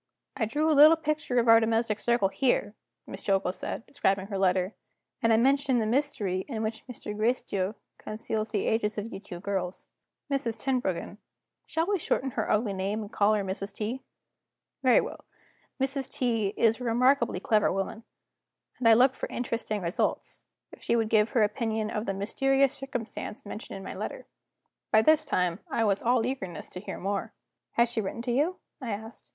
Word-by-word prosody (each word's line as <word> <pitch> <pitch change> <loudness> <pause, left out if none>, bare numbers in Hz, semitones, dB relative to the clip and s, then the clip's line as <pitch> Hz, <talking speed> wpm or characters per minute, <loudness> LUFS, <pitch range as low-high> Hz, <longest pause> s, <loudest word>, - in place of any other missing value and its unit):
"I 220 - 0
drew 295 +8 0
a - - +5
little 300 +3 +9
picture 305 -5 -1
of 235 -1 +3
our 225 0 +8
domestic 225 -1 +1
circle 235 -4 +2
here," 210 -2 +1 0.3
Miss - - -8
Jillgall 195 -2 +1
said, 225 - -5
describing 195 -8 0
her 200 - -2
letter; 185 +1 +2 0.5
"and 230 - +3
I 220 - +5
mentioned 270 +1 +3
the 220 - 0
mystery 215 -7 0
in 225 -5 -3
which 220 0 -3
Mr. 215 -4 -7
Gracedieu 215 -3 0 0.2
conceals 215 0 -3
the 210 -2 -1
ages 215 -1 0
of 215 +3 -4
you 195 - -5
two 195 -3 -9
dear - - -7
girls. 190 -2 -3 0.4
Mrs. 265 -5 -1
Tenbruggen 245 -7 -2 0.5
shall 325 +1 0
we 400 0 0
shorten 270 -3 -1
her - - -2
ugly 210 -1 +1
name 195 +3 -2
and 210 0 -8
call 210 +1 +3
her 205 - 0
Mrs. 195 +1 -4
T.? 225 +6 -3 0.8
Very 255 -2 +5
well - - -7 0.6
Mrs. 270 0 -1
T. 230 -5 0
is 225 +1 +3
a - - -3
remarkably 240 -2 +3
clever 210 +2 +2
woman, 195 +4 -3 0.8
and 235 -3 +4
I 225 - +8
looked 255 +3 +5
for - - -5
interesting 230 -4 -3
results, 170 +3 -2 0.3
if - - -14
she - - +1
would 225 -2 +1
give 215 0 +4
her 230 - +3
opinion 220 0 -1
of 210 0 -3
the 195 - -1
mysterious 270 +7 +2
circumstance 245 -5 -6
mentioned 205 +1 -7
in 195 - -9
my - - -6
letter." - - -5 0.7
By 220 0 +6
this 310 +4 +5
time, 180 -8 0
I 230 - +1
was 200 -2 +2
all 240 -1 +2
eagerness 245 -9 -4
to 180 - -7
hear 200 - -6
more. 200 +1 -3 0.4
"Has 235 0 +3
she 225 - 0
written 220 +3 -4
to 245 - -1
you?" 300 +9 +1 0.2
I 250 - -4
asked. 220 +2 -9
225 Hz, 190 wpm, -28 LUFS, 205-250 Hz, 0.8 s, little